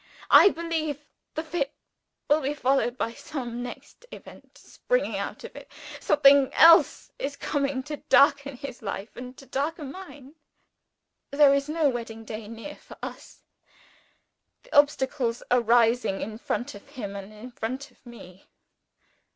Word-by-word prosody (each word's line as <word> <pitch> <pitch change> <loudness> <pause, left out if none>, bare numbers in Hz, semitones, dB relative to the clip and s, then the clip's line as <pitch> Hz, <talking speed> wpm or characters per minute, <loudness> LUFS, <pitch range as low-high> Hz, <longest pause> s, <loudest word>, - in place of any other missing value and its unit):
I 395 - +9
believe 315 -4 -3 0.3
the 315 - -2
fit 310 -3 -3 0.5
will 300 +2 +3
be 285 +2 -2
followed 265 -2 +1
by 230 - -2
some 245 -4 -6
next 245 - -9
event - - -13
springing - - -2
out - - -5
of - - -10
it. - - -12 0.3
Something 275 -2 +5
else 330 +1 +6
is 285 +1 -3
coming 275 -3 -2
to 295 +2 -6
darken 280 -1 +4
his 275 -2 -8
life 200 0 -6
and 250 +1 -9
to 270 - -13
darken 285 +1 -3
mine. 295 -7 -12 1.0
There 280 -1 +5
is 280 +1 0
no 315 -1 +2
wedding 230 -3 -4
day 215 -1 -7
near 230 +7 -9
for - - -15
us. - - -9 1.2
The - - -10
obstacles 265 -4 +2
are 250 0 +4
rising 235 -3 +2
in 220 +1 -6
front 255 +3 -3
of 205 - -13
him 215 -8 -7
and 200 +1 -8
in 215 +4 -11
front 255 +4 -5
of - - -30
me. 195 -7 -14
270 Hz, 150 wpm, -26 LUFS, 235-295 Hz, 1.2 s, I